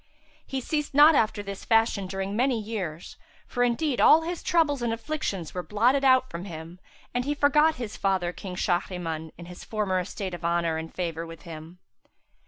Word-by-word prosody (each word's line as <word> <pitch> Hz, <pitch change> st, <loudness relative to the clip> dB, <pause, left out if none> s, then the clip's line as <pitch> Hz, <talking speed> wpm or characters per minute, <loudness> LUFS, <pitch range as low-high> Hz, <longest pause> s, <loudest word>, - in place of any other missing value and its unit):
He 265 Hz, -1 st, -3 dB
ceased 295 Hz, +1 st, -2 dB
not 300 Hz, +3 st, +8 dB
after 215 Hz, -6 st, +1 dB
this 200 Hz, -1 st, -7 dB
fashion 225 Hz, -4 st, +2 dB
during 195 Hz, +1 st, -3 dB
many 250 Hz, 0 st, +2 dB
years, 195 Hz, -7 st, -5 dB, 0.3 s
for 245 Hz, -, -3 dB
indeed 245 Hz, +3 st, +1 dB
all 320 Hz, +1 st, +7 dB
his 345 Hz, +1 st, -4 dB
troubles 300 Hz, -6 st, +2 dB
and 235 Hz, -1 st, 0 dB
afflictions 225 Hz, -, -3 dB
were 180 Hz, -, -3 dB
blotted 240 Hz, +9 st, +2 dB
out 260 Hz, -1 st, +5 dB
from 170 Hz, -2 st, -7 dB
him 165 Hz, 0 st, -9 dB, 0.3 s
and 245 Hz, -, 0 dB
he 290 Hz, +3 st, -1 dB
forgot 300 Hz, +2 st, +4 dB
his 235 Hz, -4 st, -6 dB
father 185 Hz, -3 st, 0 dB
King 185 Hz, -1 st, -7 dB
Shahriman 175 Hz, -3 st, -2 dB
and 170 Hz, 0 st, -10 dB
his 180 Hz, 0 st, -10 dB
former 205 Hz, -4 st, -1 dB
estate 185 Hz, +1 st, -5 dB
of 175 Hz, -, -7 dB
honour 170 Hz, -1 st, +1 dB
and 160 Hz, 0 st, -6 dB
favour 165 Hz, -2 st, -4 dB
with 165 Hz, -1 st, -11 dB
him. 165 Hz, 0 st, -10 dB
200 Hz, 185 wpm, -26 LUFS, 175-260 Hz, 0.3 s, not